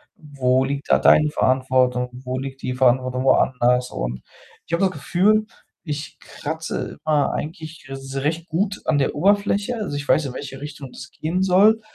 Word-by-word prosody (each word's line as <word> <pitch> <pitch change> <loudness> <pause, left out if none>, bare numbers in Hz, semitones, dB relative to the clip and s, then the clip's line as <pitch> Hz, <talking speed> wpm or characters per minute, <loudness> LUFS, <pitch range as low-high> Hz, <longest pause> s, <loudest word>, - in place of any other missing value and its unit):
Wo 130 -3 0
liegt 140 +2 -4
da - - +6
deine 150 0 +5
Verantwortung? 130 -2 +2
Wo 130 0 -5
liegt 135 0 -7
die 125 - -3
Verantwortung 130 0 +2
woanders?“ 125 -1 +3
Und - - -4 0.5
ich - - -12
habe 170 +3 +2
das 185 - +1
Gefühl, 210 +5 +2 0.4
ich 150 -2 -5
kratze - - -5
immer 150 -2 +2
eigentlich 155 -1 -6
s 135 0 -7
recht 160 +4 -2
gut 195 +5 -1
an 155 - +2
der 135 - 0
Oberfläche. 200 +6 +2
Also, 145 -8 -3
ich 145 - -6
weiß, 155 - +3
in 125 - -7
welche 135 +2 -7
Richtung 145 -3 -8
das 130 - -10
gehen 170 +4 -2
soll, 200 +4 +5
145 Hz, 170 wpm, -22 LUFS, 130-170 Hz, 0.5 s, da